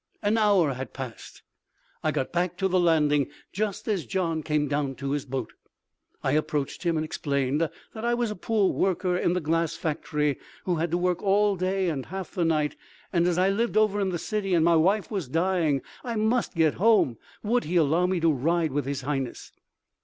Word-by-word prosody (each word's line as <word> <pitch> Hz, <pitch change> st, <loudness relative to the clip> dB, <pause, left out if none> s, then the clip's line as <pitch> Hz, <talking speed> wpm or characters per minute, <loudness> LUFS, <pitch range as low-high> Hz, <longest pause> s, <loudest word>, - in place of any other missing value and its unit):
An 205 Hz, +2 st, +2 dB
hour 200 Hz, -9 st, +3 dB
had 130 Hz, -1 st, -7 dB
passed. 130 Hz, -4 st, -8 dB, 0.6 s
I 155 Hz, -, +2 dB
got 145 Hz, -3 st, -2 dB
back 175 Hz, 0 st, 0 dB
to 190 Hz, +1 st, +1 dB
the 185 Hz, 0 st, +2 dB
landing 150 Hz, -5 st, +3 dB, 0.2 s
just 205 Hz, 0 st, -2 dB
as 200 Hz, -6 st, 0 dB
Gian 170 Hz, -4 st, -1 dB
came 150 Hz, -1 st, 0 dB
down 140 Hz, -1 st, -1 dB
to 140 Hz, +2 st, -4 dB
his 145 Hz, -1 st, -1 dB
boat. 130 Hz, -3 st, -4 dB, 0.7 s
I 130 Hz, -, +1 dB
approached 150 Hz, -1 st, -1 dB
him 170 Hz, -3 st, +1 dB
and 155 Hz, -, -1 dB
explained 140 Hz, -2 st, -1 dB
that 165 Hz, -, 0 dB, 0.3 s
I 240 Hz, 0 st, +2 dB
was 240 Hz, -2 st, -1 dB
a -, -, -4 dB
poor 210 Hz, 0 st, +1 dB
worker 185 Hz, -1 st, +1 dB
in 175 Hz, -1 st, +1 dB
the 180 Hz, -, +1 dB
glass 165 Hz, 0 st, 0 dB
factory, 150 Hz, -2 st, -1 dB, 0.2 s
who 180 Hz, -2 st, 0 dB
had 165 Hz, +2 st, 0 dB
to 170 Hz, -, +1 dB
work 180 Hz, 0 st, 0 dB
all 205 Hz, +1 st, +3 dB
day 185 Hz, +1 st, 0 dB
and 145 Hz, -6 st, -2 dB
half 190 Hz, 0 st, -6 dB
the 180 Hz, -, -1 dB
night, 155 Hz, -2 st, +1 dB, 0.4 s
and 170 Hz, -1 st, +3 dB
as 175 Hz, -1 st, +1 dB
I 185 Hz, +1 st, +3 dB
lived 230 Hz, +2 st, 0 dB
over 215 Hz, -1 st, +3 dB
in 195 Hz, -, +1 dB
the 175 Hz, -, -2 dB
city 195 Hz, +1 st, -1 dB
and 165 Hz, -1 st, +3 dB
my 170 Hz, 0 st, +5 dB
wife 190 Hz, +7 st, +2 dB
was 190 Hz, -9 st, -2 dB
dying, 165 Hz, -2 st, +1 dB, 0.2 s
I 235 Hz, -2 st, -3 dB
must 220 Hz, 0 st, +1 dB
get 160 Hz, -2 st, +3 dB
home. 210 Hz, -, +4 dB, 0.2 s
Would 240 Hz, +3 st, +1 dB
he 170 Hz, +4 st, -3 dB
allow 165 Hz, +2 st, +3 dB
me 185 Hz, -1 st, 0 dB
to 165 Hz, -1 st, +4 dB
ride 160 Hz, +4 st, +1 dB
with 145 Hz, 0 st, -1 dB
His 140 Hz, -1 st, -2 dB
Highness? 135 Hz, -2 st, -4 dB
170 Hz, 205 wpm, -26 LUFS, 150-195 Hz, 0.7 s, my